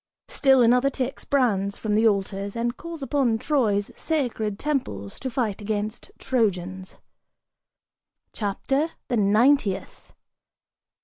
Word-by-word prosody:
Still 265 -3 +4
another 250 +3 +4
takes 265 -1 -4
brands 200 -8 +1
from 215 -2 -2
the 220 +2 +4
altars, 200 0 -1
And 235 +1 -1
calls 335 -3 -8
upon 265 -4 +1
Troy's 220 -7 0
sacred 235 -10 -2
temples 105 - -3
to 265 - -3
fight 230 -5 -2
against 210 +1 -3
Trojans." 190 -6 -1 1.4
CHAPTER 270 +8 -1 0.2
THE 245 - +1
NINTIETH. 215 +1 +2
225 Hz, 110 wpm, -25 LUFS, 200-265 Hz, 1.4 s, Still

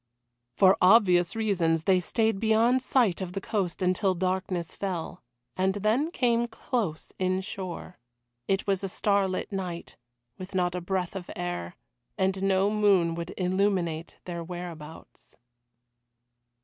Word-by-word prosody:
For 190 0 +6
obvious 180 -3 +5
reasons 175 -7 +1
they 185 0 +4
stayed 220 +2 0
beyond 225 +4 +3
sight 235 -8 +2
of 180 -1 -4
the 195 - -2
coast 195 -3 -2
until 185 +1 +2
darkness 185 -1 -2
fell, 185 -5 -4 0.3
and 190 +1 +1
then 220 +10 +1
came 240 -6 +1
close 225 - -3
inshore. 185 -1 -3 0.5
It 195 0 0
was 195 -1 0
a 195 - -2
starlit 195 -1 0
night, 180 -3 -5 0.4
with 185 +1 -8
not 180 -1 +1
a 180 - -3
breath 185 +1 -2
of 180 -2 -6
air, 90 -1 -4 0.4
and 190 0 0
no 195 +1 +2
moon 200 -6 +3
would 170 +1 -6
illuminate 180 -3 0
their 170 -2 -5
whereabouts. 165 -3 -9
190 Hz, 130 wpm, -27 LUFS, 175-200 Hz, 0.5 s, For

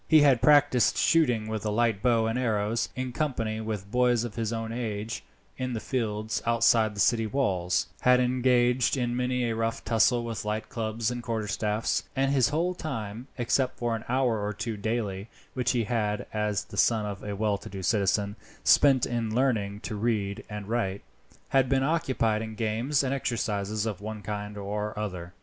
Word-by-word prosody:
He 155 -2 +6
had 135 -5 +5
practised 145 -5 +4
shooting 125 -10 +3
with 110 -1 -3
a 105 - -1
light 110 -2 +1
bow 115 -2 +3
and 115 +2 -1
arrows, 110 -2 0
in 130 0 -3
company 115 -5 -2
with 105 -3 -5
boys 125 -2 +3
of 120 -3 -5
his 115 -1 -2
own 115 -1 -3
age, 115 -1 -4 0.4
in 130 -1 -2
the 115 - -2
fields 110 -4 -2
outside 115 -2 +3
the - - -7
city 115 +1 +3
walls; 95 -8 0
had 125 0 +5
engaged 125 0 +2
in 120 -1 -1
many 125 0 0
a 115 -1 0
rough 115 0 -2
tussle 120 +1 +3
with 115 -2 -4
light 105 +1 -3
clubs 115 0 -2
and 120 0 -4
quarterstaffs; 110 -1 -1
and 135 0 +2
his 130 -4 +3
whole 170 +4 0
time 120 - -5
except 130 +1 0
for 120 -1 -1
an 110 - -6
hour 120 -4 +1
or 105 +1 -2
two 115 +2 -4
daily 105 -1 -3 0.2
which 125 -1 0
he 120 -2 +1
had, 105 -2 -1
as 105 -1 0
the - - -11
son 110 -3 +3
of 100 -2 -5
a 105 -1 -4
well 105 -1 0
to - - -10
do 95 -1 -7
citizen, 100 0 +1 0.3
spent 135 -4 +5
in 115 -2 -2
learning 110 -6 0
to - - -5
read 105 -2 -1
and 105 -2 -6
write 105 -4 -1 0.5
had 135 -2 +3
been 135 -1 +2
occupied 130 -8 +1
in 110 -1 -6
games 115 +6 0
and 135 0 0
exercises 110 -5 -1
of 105 -4 -4
one 105 0 -6
kind 105 0 -5
or 105 +1 -4
other. 90 -5 -4
115 Hz, 185 wpm, -27 LUFS, 105-125 Hz, 0.5 s, He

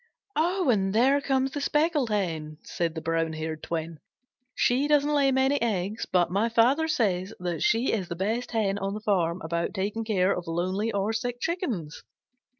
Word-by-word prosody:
"And 295 - +1
there 270 +5 +4
comes 270 -1 0
the 290 - -4
Speckled 295 -4 +1
Hen," 160 -7 -2
said 170 -1 -2
the 160 - -4
brown 165 0 0
haired 155 0 -4
twin. 165 -1 -4 0.6
"She 260 +4 +2
doesn't 295 0 +3
lay 280 -2 +3
many 265 +2 +2
eggs, 210 -1 -1
but 175 -2 +2
my 205 +5 +1
Father 255 +7 +3
says 200 - 0
that 175 -3 -3
she 230 +4 +2
is 195 -5 -1
the 170 - -5
best 220 +7 -2
Hen 205 -4 0
on 195 +1 -2
the - - -4
farm 185 -4 0
about 170 +4 -2
taking 210 +4 -2
care 195 -3 +1
of 175 - -6
lonely 185 +6 -1
or 200 +1 -1
sick 240 +2 -3
Chickens. 245 - -3
210 Hz, 175 wpm, -27 LUFS, 175-260 Hz, 0.6 s, there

